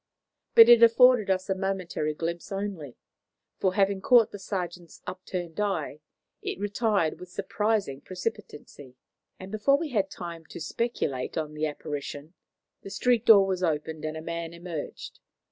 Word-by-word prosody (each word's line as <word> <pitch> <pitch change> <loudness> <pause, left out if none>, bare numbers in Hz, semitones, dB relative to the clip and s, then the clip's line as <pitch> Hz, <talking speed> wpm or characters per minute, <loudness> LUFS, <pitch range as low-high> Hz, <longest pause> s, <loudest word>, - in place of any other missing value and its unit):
But 230 0 +10
it 240 -1 +8
afforded 230 -1 +6
us 185 0 0
a 190 - +1
momentary 185 -5 -2
glimpse 170 +3 -4
only, 195 -9 -5 0.6
for, 185 -1 +1
having 195 -1 +2
caught 240 -1 +5
the 205 - -8
sergeant's 180 -4 -5
upturned 180 -1 -6
eye, 165 -8 -2 0.4
it - - -4
retired 205 -4 0
with 180 - -10
surprising 200 -5 -1
precipitancy, 180 - -7 0.4
and 190 +1 -9
before 215 +6 +3
we 320 +1 -4
had 200 -6 0
time 170 -3 -8
to - - -9
speculate 160 - -3
on 155 -1 -3
the 155 +1 -1
apparition, 145 +1 -6 0.5
the - - -9
street 240 +2 +1
door 200 -3 +8
was 190 -1 -2
opened 160 -2 -2
and 155 0 -4
a 160 - -7
man 170 0 -5
emerged. 170 -3 -7
185 Hz, 150 wpm, -27 LUFS, 160-205 Hz, 0.6 s, But